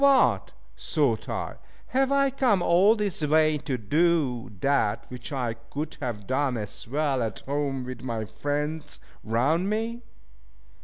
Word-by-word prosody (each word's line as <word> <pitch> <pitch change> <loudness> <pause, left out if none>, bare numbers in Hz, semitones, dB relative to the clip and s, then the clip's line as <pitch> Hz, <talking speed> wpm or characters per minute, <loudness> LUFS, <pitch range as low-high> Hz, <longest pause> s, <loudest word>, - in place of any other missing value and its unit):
What! 260 - +4 0.3
thought 120 - 0
I, - - -3 0.3
have 265 +1 +2
I 275 -1 +3
come 245 -9 +2
all 190 +7 +5
this 205 -6 -1
way 155 0 +3
to 130 -2 -2
do 135 0 +1
that 135 -7 +1
which 125 +3 -7
I 125 -5 -1
could 140 +7 -6
have 115 -7 -4
done 130 0 0
as 105 0 -4
well 140 0 0
at 110 -2 -3
home 140 -2 -2
with 125 -2 -7
my 115 -4 -3
friends 150 +5 -3 0.2
round 140 - +1
me! 225 +2 -2
145 Hz, 145 wpm, -27 LUFS, 125-170 Hz, 0.3 s, all